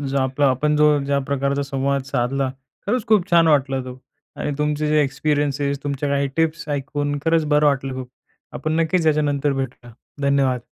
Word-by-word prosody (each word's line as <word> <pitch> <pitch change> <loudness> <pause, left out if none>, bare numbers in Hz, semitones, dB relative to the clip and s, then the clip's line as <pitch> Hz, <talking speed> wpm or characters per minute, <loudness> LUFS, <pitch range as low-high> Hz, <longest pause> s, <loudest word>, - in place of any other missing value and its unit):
जो 140 -1 -1
आपला 135 +2 +1
आपण 150 +4 +1
जो 150 0 +5 0.2
ज्या 140 0 +1
प्रकारचा 140 0 0
संवाद 140 0 -1
साधला, 135 +1 0 0.4
खरंच 245 +2 -1
खूप 215 -5 +3
छान 170 -1 +5
वाटला 135 -3 +2
तो. 125 0 -9 0.4
आणि - - -3
तुमचे 150 0 0
जे 155 0 +3
एक्सपिरियन्स, 145 0 -1 0.2
तुमच्या 145 0 -2
काही 140 0 0
टिप्स 165 0 0
ऐकून 145 0 -2
खरंच 165 -1 +2
बरं 150 0 +4
वाटलं 135 -2 0
खूप. 130 -1 -7 0.4
आपण 155 +4 -1
नक्कीच 165 0 +1
याच्यानंतर 145 -2 +1
भेटू 130 -2 -5
या. - - -13 0.3
धन्यवाद. 135 -3 +1
140 Hz, 175 wpm, -21 LUFS, 135-150 Hz, 0.4 s, जो